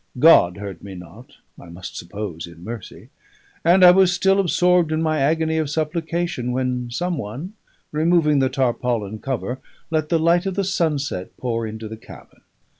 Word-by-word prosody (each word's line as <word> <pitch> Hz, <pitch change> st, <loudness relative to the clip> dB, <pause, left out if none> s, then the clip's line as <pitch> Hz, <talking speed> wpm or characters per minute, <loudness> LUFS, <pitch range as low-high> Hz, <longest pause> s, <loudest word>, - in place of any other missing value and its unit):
God 125 Hz, -, +6 dB
heard 100 Hz, -4 st, -7 dB
me 100 Hz, -1 st, -8 dB
not, 90 Hz, +7 st, -13 dB, 0.2 s
I -, -, -13 dB
must 85 Hz, +1 st, -9 dB
suppose 85 Hz, -2 st, -6 dB
in 85 Hz, 0 st, -14 dB
mercy; 110 Hz, -1 st, -9 dB, 0.5 s
and 185 Hz, +2 st, +5 dB
I 180 Hz, -, +10 dB
was 185 Hz, 0 st, +5 dB
still 195 Hz, +2 st, +2 dB
absorbed 180 Hz, -2 st, +3 dB
in 155 Hz, -, 0 dB
my 155 Hz, -1 st, 0 dB
agony 160 Hz, +3 st, +1 dB
of 155 Hz, -3 st, -1 dB
supplication 160 Hz, -3 st, -2 dB
when 125 Hz, -1 st, -2 dB
some 175 Hz, +5 st, -2 dB
one, 135 Hz, -, -6 dB, 0.4 s
removing 155 Hz, -1 st, +3 dB
the 130 Hz, -1 st, +2 dB
tarpaulin 120 Hz, -5 st, -1 dB
cover, 130 Hz, +1 st, -3 dB, 0.3 s
let 155 Hz, -1 st, 0 dB
the 170 Hz, -, +3 dB
light 170 Hz, +3 st, +2 dB
of 190 Hz, -, -2 dB
the 200 Hz, -, 0 dB
sunset 150 Hz, -, -2 dB
pour 115 Hz, -2 st, -2 dB
into 110 Hz, 0 st, -7 dB
the 110 Hz, +1 st, -8 dB
cabin. -, -, -15 dB
140 Hz, 170 wpm, -21 LUFS, 110-170 Hz, 0.5 s, I